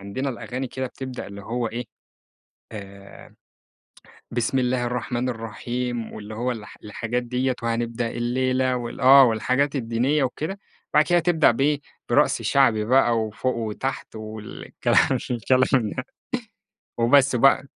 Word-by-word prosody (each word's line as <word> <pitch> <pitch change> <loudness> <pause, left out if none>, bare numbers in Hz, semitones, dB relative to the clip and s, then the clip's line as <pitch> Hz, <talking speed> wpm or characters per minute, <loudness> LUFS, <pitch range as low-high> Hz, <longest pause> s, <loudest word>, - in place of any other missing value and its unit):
عندنا 100 +8 -3
الأغاني 125 +1 -5
كده 130 +1 -4
بتبدأ 130 0 -7
اللي 100 0 -9
هو 120 +3 -2
إيه، 120 +3 -5 0.9
آآ 100 -2 -11 1.0
بسم 120 +2 0
الله 125 -1 0
الرحمن 125 0 -2
الرحيم 120 +1 -4
واللي 110 0 -8
هو 125 +3 -1
الح 110 -3 -8
الحاجات 115 +3 -3
ديّة 125 +1 -1
وهنبدأ 115 0 -1
الليلة 130 +2 0
وال 120 +1 -6
آه 135 +1 +9
والحاجات 130 +5 +1
الدينية 130 +4 +1
وكده، 155 +9 -3 0.3
بعد 150 0 +5
كده 175 -1 +3
تبدأ 165 -4 +4
بإيه؟ 140 +5 +1 0.3
برقص - - +3
شعبي 120 -6 +3
بقى 120 -2 +4
وفوق 110 +4 -2
وتحت 115 +4 -4
والكلام 110 -1 -1
الكلام 130 -1 +2
ده - - -5 0.9
وبس 125 +2 +4
بقى، 135 +2 +4
125 Hz, 130 wpm, -24 LUFS, 115-130 Hz, 1.0 s, آه